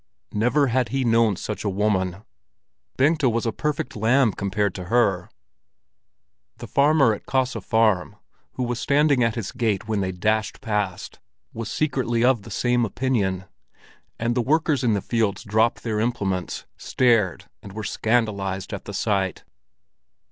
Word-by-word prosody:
Never 125 +7 +2
had 125 -2 0
he 135 +2 -1
known 115 -3 +3
such 105 +4 -5
a 105 - 0
woman; 95 -1 -1 0.7
Bengta 145 0 +3
was 115 0 -1
a 115 - +1
perfect 145 0 -3
lamb 115 +1 +3
compared 100 0 -1
to 90 - -7
her! 95 -4 +1 1.3
The - - -8
farmer 140 -4 +3
at 105 - -9
Kaase 130 -1 0
Farm, 110 -8 +1 0.4
who 130 - -3
was 120 -1 -2
standing 140 -3 +3
at 115 -1 +1
his 115 -5 -4
gate 110 -5 -1
when 110 -2 0
they 95 -1 -1
dashed 110 +4 -1
past, 105 -4 -3 0.3
was 115 -1 -5
secretly 125 -6 0
of 125 -4 +3
the - - -12
same 120 0 +1
opinion; 105 -6 -1 0.7
and 115 +1 0
the 125 - +1
workers 150 +1 +1
in 115 -3 +2
the 100 - -1
fields 110 -3 -1
dropped 110 +1 +1
their 110 -2 -1
implements, 100 -6 -2
stared 115 -8 +1 0.2
and 100 - -11
were 110 +1 -5
scandalized 100 -4 -1
at 100 - -6
the 100 - -6
sight. 95 -4 -1
110 Hz, 155 wpm, -23 LUFS, 100-125 Hz, 1.3 s, known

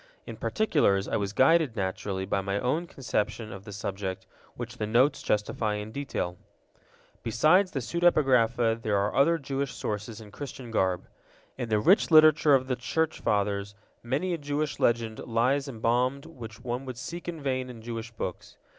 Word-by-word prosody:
In - - -7
particulars, 145 - +1
I - - -1
was 100 -1 -2
guided, 135 +3 +4
naturally, 95 -1 -2
by 100 0 0
my 100 +1 -1
own 155 +9 -1
conception 110 -5 -3
of 100 0 -10
the 105 - -8
subject, 95 -1 -4 0.3
which 120 0 -7
the 105 - -2
Notes 130 +6 +3
justify 105 0 0
in 105 +1 -5
detail. 110 -9 -4 0.8
Besides 155 - +3
the 135 - -3
pseudepigrapha 125 -7 +2
there 105 -2 +1
are 100 +1 0
other 165 +5 +4
Jewish 140 -2 -3
sources 105 +1 -4
in 105 -2 -12
Christian 130 -2 -8
garb. 95 -5 0 0.5
In 120 -3 -4
the 105 -1 +2
rich 185 - +4
literature 155 -2 +7
of 130 -1 +1
the 130 -1 -1
Church 160 +7 -1
Fathers 100 -1 -1 0.3
many 140 +10 -1
a 170 - -2
Jewish 145 +1 -2
legend 115 -2 +1
lies 125 +5 +1
embalmed 125 +3 0
which 120 -8 -10
one 125 +2 -3
would 130 -2 -6
seek 170 +7 -7
in 170 -2 -4
vain 130 -2 -2
in 115 -3 -10
Jewish 115 -1 -5
books. 100 -6 -6
120 Hz, 170 wpm, -28 LUFS, 105-140 Hz, 0.8 s, literature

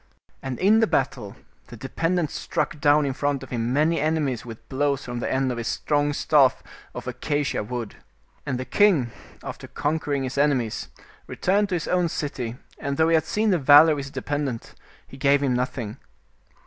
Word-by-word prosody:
And 135 -2 -4
in 210 +4 +4
the 225 - +3
battle - - -1 0.3
the - - -11
dependent 170 -2 -1
struck 155 -1 -3
down 145 +1 +4
in 135 - -1
front 145 0 -1
of 135 - -12
him 120 -1 -1
many 155 +5 +2
enemies, 150 -5 0
with 115 -3 -11
blows 140 0 -1
from 120 -1 -4
the - - -2
end 130 0 +1
of 120 - -4
his 115 - -4
strong 145 -1 0
staff 145 -2 +3 0.3
of - - -7
acacia 145 -2 -1
wood. 115 -1 -6 0.5
And 130 -3 -3
the 130 - -4
king, 170 - +3 0.3
after - - -7
conquer 145 0 -2
ing 140 -1 0
his 130 +1 -3
enemies, 130 -6 0 0.4
returned 200 +2 +1
to 185 - 0
his 165 - -3
own 180 -2 +1
city, 135 -7 -4 0.2
and 140 0 -3
though 160 0 +3
he - - +3
had 160 -1 +3
seen 215 +5 +1
the 180 - +2
valor 145 +3 +8
of 150 - 0
his 140 0 -6
dependent, 140 -4 -4 0.3
he 135 - -13
gave 140 0 +3
him 130 -2 +1
nothing. 125 -2 -3
145 Hz, 190 wpm, -24 LUFS, 130-155 Hz, 0.5 s, valor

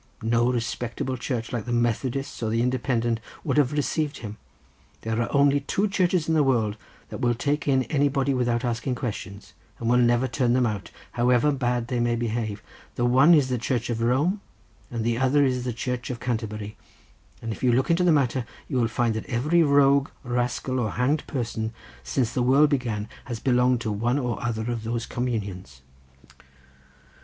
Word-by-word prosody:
No 120 +2 +2
respectable 120 +2 -3
church 125 -1 -4
like 115 -4 -2
the 120 - -4
Methodist 120 +3 -1
or 110 - -1
the 115 +2 +1
Independent 120 -2 0 0.2
would - - -1
have 140 -4 +3
received 150 0 -1
him. 105 -2 -8 0.6
There 110 +1 -1
are 115 - -2
only 140 0 +4
two 190 +9 0
churches 180 -4 +1
in 160 - +1
the 155 - +4
world 115 -7 +1 0.3
that - - -7
will 120 -1 +1
take 145 +5 -1
in 130 -2 +3
anybody 140 -1 +1
without 120 -1 0
asking 120 +2 -1
questions, 100 -4 -6 0.2
and 115 - -4
will 125 +1 +4
never 120 +1 +3
turn 120 -1 +1
them 125 0 +3
out 105 -4 -3 0.2
however 125 +4 +3
bad 125 -3 -1
they 125 -1 -1
may 120 0 +1
behave; 110 -2 -3 0.3
the 120 - 0
one 135 +7 +6
is 140 -4 +3
the 125 -1 -1
Church 120 0 -1
of 115 -1 -2
Rome, 145 - +1 0.5
and 115 -2 -3
the 115 0 0
other 135 +2 +3
the 125 0 -2
Church 125 +1 -4
of 125 -2 -4
Canterbury; 110 -3 -4 0.6
and 115 - -5
if - - -7
you 125 - +3
look 130 +5 +2
into 170 +2 +3
the 180 - +4
matter 130 -5 +1 0.2
you 135 - -2
will 120 -2 +2
find 115 0 0
that 110 - -5
every 145 +7 +2
rogue, 140 -2 +4
rascal, 125 +1 -1
and 110 - -2
hanged 140 +5 0
person 115 -4 -3 0.3
since 120 -4 -1
the 125 - 0
world 140 +4 +4
began 115 -6 -1 0.2
has 120 -3 -5
belonged 125 -1 +2
to 110 - -2
one 115 +6 0
or 125 -4 -2
other 115 0 -2
of 115 -2 -4
those 115 +1 -2
communions." 100 - -4
125 Hz, 185 wpm, -25 LUFS, 115-135 Hz, 0.6 s, one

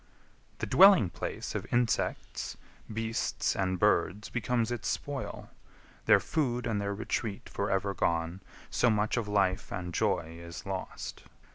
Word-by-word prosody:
The - - -2
dwelling 190 - +7
place - - -4
Of - - -5
insects, 120 -2 0 0.3
beasts, 115 +1 -1
and 95 -1 0
birds, 100 +3 +2
becomes 120 0 0
its 120 -3 -3
spoil; - - -4 0.5
Their - - +7
food 125 -6 -1
and 105 -3 0
their 100 0 -2
retreat 110 -1 -3
for 100 - -2
ever 95 +1 0
gone, 85 +1 0 0.3
So 125 - +3
much 105 -1 +1
of 115 -3 -1
life 100 -1 +1
and 90 -1 -4
joy 80 0 0
is 85 0 -8
lost. 95 -1 -5
105 Hz, 140 wpm, -30 LUFS, 95-115 Hz, 0.5 s, dwelling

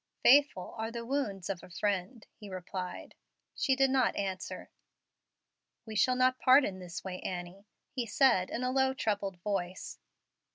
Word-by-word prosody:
"Faithful 280 -8 +5
are 220 0 -2
the 235 0 -6
wounds 225 -9 -2
of 195 -3 -3
a - - -13
friend," 200 +4 -2
he 210 -2 -11
replied. 185 0 -6 0.4
She 265 - +1
did 270 0 +3
not 260 -2 +2
answer. 190 -2 -4 1.1
"We 220 -1 -7
shall 255 +5 +3
not 255 0 +3
part 260 +2 +6
in 190 -1 -4
this 180 -2 -7
way, 185 -1 -5
Annie," 180 +3 -6 0.2
he 245 -3 -3
said, 225 -6 +3
in 245 - -3
a 255 - 0
low, 265 0 +2
troubled 205 -6 -1
voice. 185 -3 -3
205 Hz, 160 wpm, -31 LUFS, 185-255 Hz, 1.1 s, part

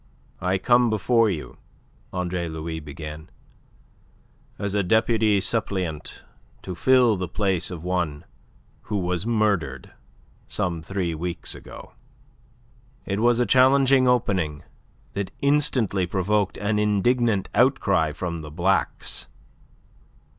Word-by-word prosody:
"I 95 +1 +1
come 120 +4 +3
before 115 +1 +2
you," 80 -6 -5 0.5
Andre 90 -1 -2
Louis 80 0 -5
began, 75 +1 -9 1.3
"as 100 -1 -3
a 105 - +2
deputy 110 +1 +2
suppleant 95 -7 -2 0.4
to 90 - -5
fill 125 +2 +4
the 90 -1 -3
place 95 -1 -1
of 85 -3 -7
one 85 -4 -2 0.6
who 105 - 0
was 90 +1 -2
murdered 100 - 0 0.6
some 85 -3 -2
three 90 0 -2
weeks 85 +2 -3
ago." - - -11 1.1
It 100 +1 -2
was 120 +1 +3
a 125 - +3
challenging 130 0 +5
opening 95 -11 0 0.5
that 100 -1 -3
instantly 130 -10 +2
provoked 100 +2 0
an 105 +1 0
indignant 105 0 +1
outcry 100 - +2
from 85 +1 -4
the 75 - -8
Blacks. 90 +5 -1
95 Hz, 110 wpm, -24 LUFS, 85-110 Hz, 1.3 s, challenging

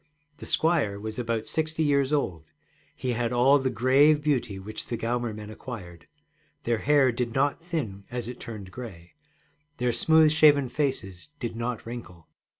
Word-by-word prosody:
The - - -9
squire 155 -12 +2
was 110 +2 -5
about 115 -2 -2
sixty 160 0 -1
years 140 -2 +2
old; 85 - -2 0.4
he 130 - -2
had 120 0 -1
all 130 +4 +5
the 130 -1 0
grave 135 +5 +4
beauty 130 -9 0
which 105 +3 -7
the 120 - -3
Gaumer 120 0 -1
men 105 0 -8
acquired. 95 -8 -9 0.6
Their 115 -2 0
hair 140 -1 +4
did 120 -1 -3
not 140 +3 +1
thin 140 - -4
as 120 -2 -4
it 125 0 -7
turned 105 -5 -8
gray, 95 -9 -10 0.6
their 125 -1 0
smooth 160 +2 +5
shaven 145 -4 +5
faces 130 -9 -3
did 120 -2 -4
not 120 0 -3
wrinkle. 105 -8 -9
120 Hz, 160 wpm, -27 LUFS, 110-145 Hz, 0.6 s, all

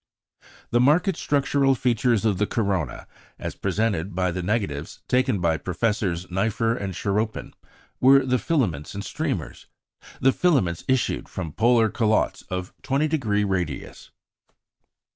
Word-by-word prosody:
"The 120 - +3
marked 160 +9 +3
structural 140 -2 +2
features 120 -3 +1
of 100 -4 +1
the 105 - +1
corona, 100 -7 -2 0.3
as - - -5
presented 100 -2 -1
by 90 0 +1
the 90 +1 -3
negatives" 90 -7 -3
taken 125 -4 +2
by 85 -2 +1
Professors 95 -1 -1
Nipher 115 +4 0
and 100 -6 -4
Charroppin, 105 +3 -2 0.5
were 135 +1 +6
the 125 -1 +1
filaments 100 - -1
and 100 - -4
the - - -7
streamers. - - -4 0.5
The 135 - +4
filaments 125 - +1
issued 130 -1 0
from 85 -5 -5
polar 115 +1 +3
calottes 110 -1 +1
of 90 0 -4
20° 135 -8 0
radius. 90 -8 -4
110 Hz, 130 wpm, -24 LUFS, 95-125 Hz, 0.5 s, were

